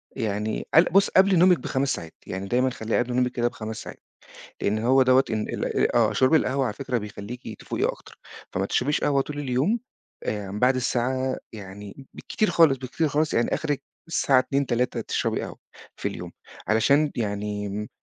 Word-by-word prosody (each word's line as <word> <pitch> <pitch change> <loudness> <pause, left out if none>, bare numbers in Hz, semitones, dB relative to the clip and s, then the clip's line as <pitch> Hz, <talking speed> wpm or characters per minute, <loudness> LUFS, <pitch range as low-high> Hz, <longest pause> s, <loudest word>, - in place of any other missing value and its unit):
يعني 105 0 -2
قل 160 - +8
بُص 195 +3 +3
قبل 190 -1 +5
نومِك 180 -1 +5
ب5 135 0 -1
ساعات، 80 -1 -7
يعني 95 +1 -4
دايمًا 125 +4 +2
خلّيها 115 -3 -1
قبل 125 0 -5
نومِك 125 0 +1
كده 120 -1 0
ب5 110 -3 -6
ساعات، - - -10 0.6
لإن 105 +2 +1
هو 130 +4 +4
دوّة 130 +1 +5
إن 110 -1 -2
ال - - 0
آه، 115 -3 +4
شرب 130 +4 +3
القهوة 135 -3 +2
على 110 -4 -2
فكرة 125 0 -2
بيخليكِ 105 +2 -8
تفوقي - - -2
أكتر، - - -4 0.3
فما 95 +2 -1
تشربيش 140 +8 0
قهوة 140 -1 +2
طول 145 +1 -7
اليوم، 145 - +1 0.5
آمم، 105 -1 -3
بعد 125 +3 +3
الساعة 130 +1 0 0.2
يعني 105 +4 -10
بالكتير 215 - -1
خالص، 155 -6 +5
بالكتير 135 +5 -1
خالص 150 +2 0
يعني 115 - +2
آخرك 150 -3 -2 0.3
الساعة 140 -5 +3
14:00 140 +2 0
15:00 120 0 0
تشربي - - -1
قهوة - - -7 0.4
في - - -2
اليوم، - - -8 0.4
علشان 140 +8 +3
يعني 105 -1 -3
125 Hz, 175 wpm, -25 LUFS, 110-140 Hz, 0.6 s, قل